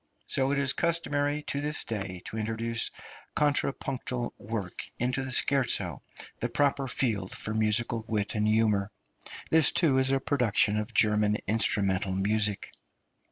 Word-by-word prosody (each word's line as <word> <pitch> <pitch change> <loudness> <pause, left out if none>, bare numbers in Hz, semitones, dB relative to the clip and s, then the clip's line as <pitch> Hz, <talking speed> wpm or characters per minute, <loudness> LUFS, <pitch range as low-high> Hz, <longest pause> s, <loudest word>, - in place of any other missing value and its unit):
So 135 0 +1
it 140 - +1
is 140 -1 +2
customary 150 -3 0
to 140 - -3
this 150 +2 -1
day 95 -5 -5
to - - -7
introduce 115 +1 -2 0.5
contrapuntal 135 -4 -1
work 105 -4 -5 0.2
into 125 +2 -1
the 130 - -5
scherzo, 135 0 +3 0.4
the 120 - -2
proper 140 +2 +1
field 110 -8 -1
for 110 - -3
musical 110 +1 +1
wit 105 -2 -1
and 105 -1 0
humour. 110 -2 +2 0.6
This, 160 -2 +6
too, 160 -5 +2
is 130 0 +2
a 135 - +2
production 115 -6 +1
of 105 +3 -5
German 105 -2 +3
instrumental 100 -3 +2
music. 105 +1 0
115 Hz, 140 wpm, -28 LUFS, 105-135 Hz, 0.6 s, This